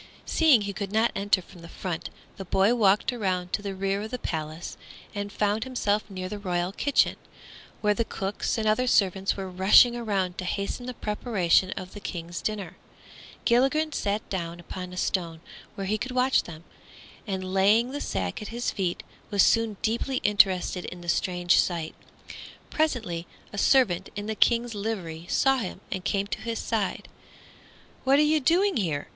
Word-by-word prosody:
Seeing 305 -9 +5
he 200 0 -3
could 195 -1 -5
not 220 +2 +2
enter 200 -2 +1
from 175 0 -15
the 170 - -11
front, 175 -2 -5 0.3
the 195 - -5
boy 195 +5 +3
walked 210 +1 +3
around 185 -6 -2
to - - 0
the 200 -1 -4
rear 195 +1 -1
of 215 - -5
the 250 - -3
palace 160 -5 -5 0.4
and 205 0 -4
found 210 +2 0
himself 215 -5 0
near 185 -2 -5
the 205 +2 -6
royal 180 -2 -1
kitchen, 280 +7 +2 0.6
where 210 -1 +3
the 230 - 0
cooks 195 0 -3
and 220 -1 -1
other 250 +4 +2
servants 195 -4 +2
were 195 -1 -4
rushing 190 +6 +6
around 195 -6 -1
to - - -3
hasten 200 +6 -3
the 250 - -5
preparation 210 -5 +1
of 185 0 -7
the 205 - -8
King's 170 -3 -5
dinner. 195 -5 -4 0.7
Gilligren 270 +6 +3
sat 205 -3 -1
down 170 -2 -4
upon 180 +1 -7
a 180 - -9
stone 170 -4 -1 0.4
where 195 -2 -4
he 215 +3 0
could 255 +3 -4
watch 255 +1 +3
them, 160 -1 -10 0.6
and 185 -1 -3
laying 210 +6 +4
the 290 - -4
sack 95 -2 -3
at 210 - -6
his 235 +3 -2
feet 180 -3 -2 0.3
was 200 -2 +4
soon 230 -3 +2
deeply 235 +4 0
interested 190 -3 +3
in 180 - -8
the 175 - -6
strange 180 0 +2
sight. 170 -3 -1 0.8
Presently 225 - -1 0.3
a - - -6
servant 195 -10 +3
in 205 0 -4
the 220 - -2
King's 235 +2 +2
livery 185 -6 -4
saw 270 -1 +3
him 190 -6 -4
and 185 -2 -3
came 200 -1 0
to 200 - -5
his 230 -1 -3
side. 220 -4 -2 1.0
"What 270 +1 +4
are 300 - +5
you 305 +1 +3
doing 355 +7 +3
here?" 160 -9 -1
200 Hz, 180 wpm, -27 LUFS, 180-230 Hz, 1.0 s, rushing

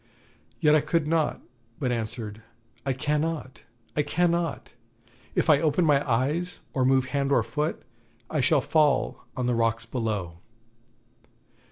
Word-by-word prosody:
Yet 150 -1 +4
I 155 - +5
could 155 +1 0
not, 160 -1 +1 0.4
but 130 -3 -1
answered: 110 -2 -4 0.5
'I 135 - +2
cannot, 150 0 -2 0.3
I 150 - +3
cannot; 170 0 0 0.6
if - - +1
I 150 -2 +5
open 160 +2 +2
my 145 -3 +4
eyes, 150 +10 0
or 135 -5 +1
move 130 0 +3
hand 140 -1 0
or 120 - +4
foot, 150 +8 -2 0.4
I 155 - 0
shall 145 +2 +4
fall 150 -2 +1
on 125 - -1
the 125 - +1
rocks 115 -1 +1
below.' 105 -8 -3
140 Hz, 140 wpm, -26 LUFS, 120-155 Hz, 0.6 s, I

